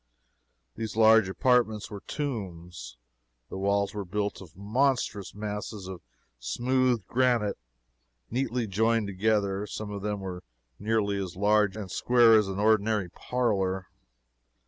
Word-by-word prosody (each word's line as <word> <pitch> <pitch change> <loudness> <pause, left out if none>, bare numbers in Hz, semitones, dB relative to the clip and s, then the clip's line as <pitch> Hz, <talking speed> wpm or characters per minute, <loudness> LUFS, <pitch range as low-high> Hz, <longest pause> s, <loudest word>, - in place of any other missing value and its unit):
These 110 -2 -5
large 110 -2 +6
apartments 115 -1 +1
were 100 - -6
tombs. 90 - -5 0.5
The - - -6
walls 100 +1 +1
were 105 -1 -4
built 100 +3 -3
of 90 -3 -14
monstrous 105 -2 0
masses 105 -1 -5
of 95 -2 -8 0.4
smoothed 120 - 0
granite, 120 - +1 0.7
neatly 125 -1 -1
joined 110 +2 +1
together. 100 0 0
Some 105 0 -6
of 100 -1 -5
them 105 0 -2
were 90 -2 -6 0.4
nearly 105 -2 0
as 90 -3 -6
large 105 +1 +2
square 120 -2 +5
as 105 -2 +4
an 95 0 -4
ordinary 105 -3 +2
parlor. 95 -5 -1
105 Hz, 125 wpm, -28 LUFS, 95-115 Hz, 0.7 s, large